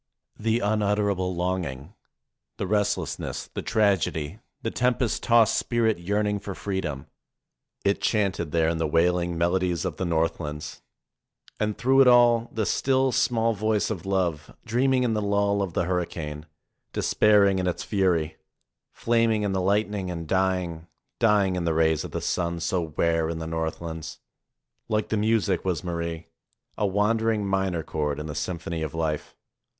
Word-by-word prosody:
The 115 Hz, +2 st, +1 dB
unutterable 100 Hz, -3 st, 0 dB
longing, 90 Hz, -3 st, -3 dB, 0.6 s
the -, -, -2 dB
restlessness, 100 Hz, -6 st, -2 dB
the -, -, -3 dB
tragedy, 100 Hz, -5 st, 0 dB, 0.2 s
the 115 Hz, -, -1 dB
tempest 125 Hz, -1 st, 0 dB
tossed 115 Hz, -2 st, +4 dB
spirit 115 Hz, -5 st, +1 dB
yearn 100 Hz, +4 st, 0 dB
ing 105 Hz, 0 st, 0 dB
for 100 Hz, -1 st, -6 dB
freedom; 90 Hz, -9 st, -3 dB, 0.8 s
it 100 Hz, 0 st, +2 dB
chanted 100 Hz, -7 st, 0 dB
there 80 Hz, 0 st, +2 dB
in 80 Hz, 0 st, 0 dB
the 80 Hz, -, +1 dB
wailing 85 Hz, +2 st, +1 dB
melo 85 Hz, +2 st, +2 dB
dies 90 Hz, -1 st, -1 dB
of 90 Hz, -5 st, -3 dB
the 95 Hz, -, -2 dB
Northlands. 80 Hz, -3 st, -2 dB, 0.8 s
And 105 Hz, -1 st, -1 dB
through 135 Hz, +2 st, +4 dB
it 135 Hz, -, +6 dB
all 120 Hz, -1 st, +5 dB
the 110 Hz, -2 st, -1 dB
still, 130 Hz, +2 st, +2 dB
small 115 Hz, -2 st, +2 dB
voice 110 Hz, +1 st, 0 dB
of 95 Hz, -3 st, -5 dB
love, 90 Hz, -5 st, -1 dB
dreaming 125 Hz, +2 st, +2 dB
in 120 Hz, -2 st, +1 dB
the 105 Hz, -, 0 dB
lull 100 Hz, 0 st, +1 dB
of 95 Hz, -4 st, -3 dB
the -, -, +1 dB
hurricane, 80 Hz, -4 st, -3 dB, 0.5 s
despairing 100 Hz, -2 st, +4 dB
in 90 Hz, -, -1 dB
its 90 Hz, -, -2 dB
fury, 85 Hz, -6 st, 0 dB, 0.5 s
flaming 115 Hz, -2 st, +1 dB
in 100 Hz, -, 0 dB
the 95 Hz, -1 st, 0 dB
lightning 100 Hz, 0 st, 0 dB
and 85 Hz, -2 st, -5 dB
dying, 90 Hz, -3 st, 0 dB, 0.3 s
dying 105 Hz, -5 st, +3 dB
in 90 Hz, -, -2 dB
the 85 Hz, -1 st, 0 dB
rays 80 Hz, -1 st, +2 dB
of -, -, -6 dB
the -, -, -4 dB
sun 85 Hz, -1 st, -1 dB
so 85 Hz, +1 st, -1 dB
rare 80 Hz, -1 st, +2 dB
in 85 Hz, -, -3 dB
the 80 Hz, -, -5 dB
north 80 Hz, 0 st, -3 dB
lands. 80 Hz, -1 st, -6 dB, 0.7 s
Like 105 Hz, -1 st, 0 dB
the 110 Hz, -, 0 dB
music 105 Hz, -3 st, +1 dB
was 90 Hz, -2 st, -1 dB
Marie, 85 Hz, -2 st, -4 dB, 0.5 s
a 105 Hz, -, 0 dB
wandering 105 Hz, +2 st, +1 dB
minor 95 Hz, -4 st, 0 dB
chord 75 Hz, -2 st, -2 dB
in 75 Hz, -, -5 dB
the 75 Hz, -, -5 dB
symphony 85 Hz, 0 st, -4 dB
of 80 Hz, +1 st, -4 dB
life. 80 Hz, -2 st, -2 dB
95 Hz, 160 wpm, -26 LUFS, 85-105 Hz, 0.8 s, it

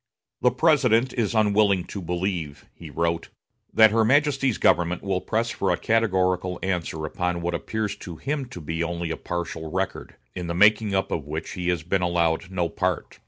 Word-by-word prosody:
"The 125 Hz, -, +5 dB
President 130 Hz, -6 st, +3 dB
is 115 Hz, -2 st, -1 dB
unwilling 105 Hz, -3 st, +3 dB
to 100 Hz, -, -7 dB
believe," 85 Hz, -5 st, -3 dB
he -, -, -11 dB
wrote, 85 Hz, 0 st, -1 dB, 0.4 s
"that 110 Hz, -1 st, +6 dB
her 115 Hz, +1 st, +3 dB
Majesty's 135 Hz, -1 st, +2 dB
government 85 Hz, 0 st, +2 dB
will 95 Hz, -2 st, -1 dB
press 115 Hz, +1 st, -1 dB
for 95 Hz, -, -1 dB
a 90 Hz, -, +2 dB
categorical 95 Hz, -5 st, +1 dB
answer 85 Hz, -4 st, -2 dB
upon 90 Hz, +2 st, -2 dB
what 85 Hz, +1 st, -2 dB
appears 110 Hz, +5 st, -2 dB
to 85 Hz, -, -8 dB
him 140 Hz, -, -3 dB
to 90 Hz, -, -9 dB
be 80 Hz, +1 st, -4 dB
only 85 Hz, 0 st, -3 dB
a -, -, -1 dB
partial 85 Hz, -2 st, -4 dB
record, 95 Hz, +3 st, -3 dB, 0.2 s
in 90 Hz, -2 st, -5 dB
the 85 Hz, -, -3 dB
making 105 Hz, +1 st, +4 dB
up 95 Hz, -, 0 dB
of 75 Hz, -3 st, -3 dB
which 80 Hz, +2 st, -5 dB
he 90 Hz, -1 st, -3 dB
has 85 Hz, -3 st, 0 dB
been 90 Hz, +3 st, 0 dB
allowed 85 Hz, 0 st, 0 dB
no 90 Hz, -2 st, -1 dB
part. -, -, -3 dB
90 Hz, 185 wpm, -24 LUFS, 85-110 Hz, 0.4 s, that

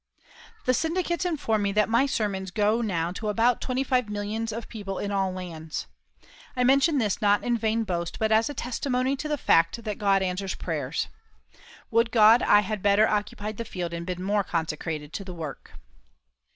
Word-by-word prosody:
The 255 Hz, -, +3 dB
syndicates 345 Hz, +4 st, -1 dB
inform 280 Hz, -11 st, 0 dB
me 200 Hz, 0 st, 0 dB
that 210 Hz, 0 st, +3 dB
my 235 Hz, +5 st, +3 dB
sermons 200 Hz, -7 st, -2 dB
go 210 Hz, +4 st, +1 dB
now 175 Hz, -6 st, -1 dB
to 210 Hz, +4 st, -4 dB
about 230 Hz, +3 st, +2 dB
twenty 255 Hz, +1 st, -1 dB
five 250 Hz, -4 st, +1 dB
millions 210 Hz, +2 st, -3 dB
of 230 Hz, +1 st, -6 dB
people 200 Hz, -4 st, -6 dB
in 205 Hz, -, -3 dB
all 195 Hz, -1 st, 0 dB
lands. 165 Hz, -4 st, -6 dB, 0.7 s
I 250 Hz, -, +2 dB
mention 275 Hz, +4 st, +4 dB
this 215 Hz, -6 st, 0 dB
not 205 Hz, -1 st, +3 dB
in 240 Hz, -1 st, +1 dB
vain 225 Hz, 0 st, 0 dB
boast, 170 Hz, -4 st, -3 dB
but 220 Hz, 0 st, 0 dB
as 220 Hz, +3 st, +3 dB
a 290 Hz, -, -6 dB
testimony 255 Hz, +1 st, -1 dB
to 305 Hz, -, -4 dB
the 300 Hz, -1 st, -1 dB
fact 165 Hz, 0 st, +2 dB
that 210 Hz, -2 st, -4 dB
God 195 Hz, -2 st, +3 dB
answers 190 Hz, +1 st, -2 dB
prayer. -, -, -4 dB, 1.0 s
Would 230 Hz, +1 st, +3 dB
God 225 Hz, +1 st, +6 dB
I 205 Hz, -, +5 dB
had 210 Hz, 0 st, -4 dB
better 205 Hz, +2 st, +4 dB
occupied 210 Hz, 0 st, -2 dB
the 230 Hz, -, -3 dB
field 175 Hz, -5 st, -5 dB
and 170 Hz, 0 st, -4 dB
been 180 Hz, +1 st, -4 dB
more 205 Hz, +1 st, +1 dB
consecrated 160 Hz, -2 st, -3 dB
to 200 Hz, -, -4 dB
the 185 Hz, -2 st, -8 dB
work! 155 Hz, -5 st, -8 dB
210 Hz, 190 wpm, -26 LUFS, 190-235 Hz, 1.0 s, God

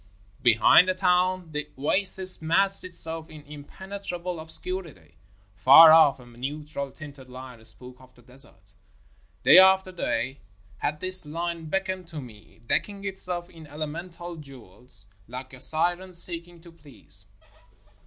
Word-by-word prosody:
Behind 120 Hz, +10 st, +4 dB
the 185 Hz, -, -1 dB
town, 180 Hz, -2 st, 0 dB
the 150 Hz, 0 st, -6 dB
oasis 185 Hz, +5 st, +5 dB
massed 195 Hz, +5 st, +3 dB
itself 165 Hz, -2 st, -2 dB
in 155 Hz, -1 st, -14 dB
impenetrable 175 Hz, +4 st, -8 dB
obscurity. 160 Hz, -, -5 dB, 0.3 s
Far 140 Hz, +11 st, +7 dB
off, 150 Hz, -4 st, +4 dB
a 125 Hz, -, -15 dB
neutral 140 Hz, +4 st, -7 dB
tinted 140 Hz, -2 st, -14 dB
line 125 Hz, -2 st, -12 dB
spoke 125 Hz, +2 st, -11 dB
of 130 Hz, 0 st, -21 dB
the 120 Hz, -, -22 dB
desert. 130 Hz, +3 st, -10 dB, 0.7 s
Day -, -, +7 dB
after 190 Hz, 0 st, +4 dB
day 135 Hz, -6 st, -4 dB, 0.4 s
had 150 Hz, +1 st, -4 dB
this 185 Hz, 0 st, -2 dB
line 165 Hz, +2 st, -6 dB
beckoned 185 Hz, +1 st, -4 dB
to 160 Hz, -3 st, -9 dB
me, 115 Hz, -4 st, -15 dB
decking 200 Hz, -, -3 dB
itself 180 Hz, -2 st, -4 dB
in 165 Hz, -3 st, -15 dB
elemental 170 Hz, +4 st, -8 dB
jewels 125 Hz, -7 st, -10 dB, 0.2 s
like 130 Hz, +2 st, -10 dB
a 130 Hz, -, -7 dB
siren 175 Hz, +3 st, 0 dB
seeking 170 Hz, 0 st, +4 dB
to 170 Hz, 0 st, -16 dB
please. 135 Hz, -, -1 dB
160 Hz, 135 wpm, -24 LUFS, 135-180 Hz, 0.7 s, Far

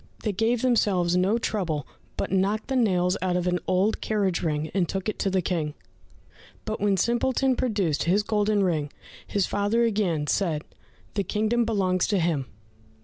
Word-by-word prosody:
They 215 Hz, -, 0 dB
gave 225 Hz, +4 st, 0 dB
themselves 195 Hz, -8 st, +2 dB
no 190 Hz, +5 st, +2 dB
trouble, 175 Hz, -, -2 dB, 0.3 s
but -, -, -2 dB
knocked 200 Hz, +5 st, 0 dB
the 265 Hz, -, 0 dB
nails 185 Hz, -6 st, +2 dB
out 180 Hz, -1 st, +1 dB
of 180 Hz, -, -1 dB
an 180 Hz, 0 st, +1 dB
old 185 Hz, +4 st, +1 dB
carriage 200 Hz, -5 st, 0 dB
ring, 155 Hz, -1 st, -2 dB
and 180 Hz, -4 st, +1 dB
took 195 Hz, 0 st, -3 dB
it 215 Hz, -, -3 dB
to 195 Hz, -, +1 dB
the 190 Hz, -1 st, 0 dB
King; 160 Hz, -4 st, -2 dB, 0.9 s
but 215 Hz, -1 st, -4 dB
when 200 Hz, -1 st, +2 dB
Simpleton 255 Hz, +4 st, +1 dB
produced 205 Hz, -, 0 dB
his 195 Hz, +5 st, +2 dB
golden 210 Hz, -1 st, +1 dB
ring, 155 Hz, -5 st, 0 dB, 0.4 s
his 200 Hz, -2 st, +1 dB
father 205 Hz, +4 st, +1 dB
again 200 Hz, -9 st, +1 dB
said, 155 Hz, -1 st, 0 dB, 0.5 s
"The 200 Hz, -, 0 dB
kingdom 220 Hz, +5 st, +1 dB
belongs 190 Hz, -5 st, +1 dB
to 205 Hz, -, +1 dB
him." 165 Hz, -7 st, 0 dB
195 Hz, 170 wpm, -26 LUFS, 175-215 Hz, 0.9 s, themselves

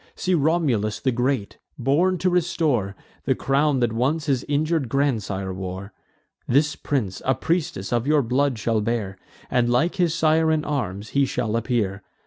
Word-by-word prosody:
See 185 Hz, -, -1 dB
Romulus 140 Hz, -, +1 dB
the 130 Hz, -, +1 dB
great, 125 Hz, -3 st, -1 dB, 0.2 s
born 155 Hz, +8 st, +2 dB
to 185 Hz, +1 st, +1 dB
restore 155 Hz, -, 0 dB, 0.3 s
The -, -, +2 dB
crown 140 Hz, 0 st, +1 dB
that 120 Hz, -2 st, +1 dB
once 140 Hz, +7 st, 0 dB
his 135 Hz, -4 st, +1 dB
injur'd 150 Hz, -2 st, 0 dB
grandsire 105 Hz, -9 st, -1 dB
wore. 95 Hz, +2 st, -6 dB, 0.5 s
This 150 Hz, +4 st, +2 dB
prince 105 Hz, -10 st, -2 dB
a 130 Hz, -, +2 dB
priestess 165 Hz, +1 st, -2 dB
of 120 Hz, +2 st, 0 dB
your 150 Hz, -2 st, +3 dB
blood 130 Hz, +2 st, +1 dB
shall 110 Hz, 0 st, 0 dB
bear, 105 Hz, -4 st, -2 dB, 0.3 s
And 120 Hz, -1 st, +2 dB
like 160 Hz, +11 st, +1 dB
his 170 Hz, -3 st, +2 dB
sire 160 Hz, 0 st, +3 dB
in 155 Hz, -1 st, 0 dB
arms 110 Hz, -8 st, -3 dB
he 140 Hz, 0 st, +2 dB
shall 110 Hz, -3 st, -2 dB
appear. 115 Hz, -5 st, -1 dB
130 Hz, 160 wpm, -23 LUFS, 110-155 Hz, 0.5 s, your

